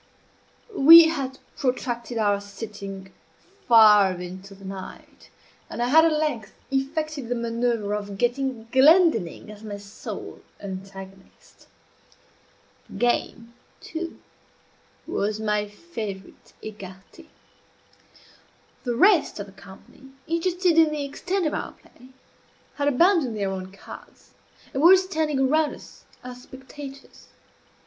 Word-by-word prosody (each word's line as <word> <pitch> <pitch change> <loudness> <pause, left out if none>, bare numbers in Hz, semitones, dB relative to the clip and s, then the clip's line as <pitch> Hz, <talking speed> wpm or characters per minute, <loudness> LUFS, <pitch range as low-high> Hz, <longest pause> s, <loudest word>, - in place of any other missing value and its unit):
We 325 +2 +9
had 270 -5 -4 0.2
protracted 245 -2 -3
our 205 -2 +1
sitting 200 -2 -9 0.5
far 210 -4 +7
into 185 +2 -9
the 195 0 -15
night, 190 -1 -10 0.4
and - - -7
I 240 +1 0
had 320 +4 +6
at 330 - +3
length 300 -8 -2 0.2
effected 280 -1 -2
the 245 - 0
manoeuvre 230 -3 -1
of 205 -1 -6
getting 245 0 -1
Glendinning 265 - +4
as 210 0 -13
my 205 -2 -6
sole 200 0 -9 0.2
antagonist. 195 0 -11 1.2
The - - -9
game, 235 -1 -1 0.3
too, 335 +1 -7 0.9
was 210 +1 -2
my 210 -1 -1
favorite 205 - -9
écarté. 205 - -11 1.6
The 245 -2 -2
rest 370 - +3
of 200 - -4
the 200 - -15
company, 195 +7 -16 0.2
interested 340 +1 +1
in 320 -1 +5
the 300 -2 -3
extent 365 +6 -3
of 305 - -1
our - - -4
play, 250 - -20 0.7
had 285 0 0
abandoned 290 - +3
their 200 -2 -1
own 190 0 -6
cards, 195 - -14 0.4
and 270 - -1
were 360 +4 +8
standing 315 -7 -1
around 300 +3 +2
us - - -16 0.2
as 250 0 -9
spectators. 270 +1 -12
240 Hz, 120 wpm, -24 LUFS, 205-300 Hz, 1.6 s, We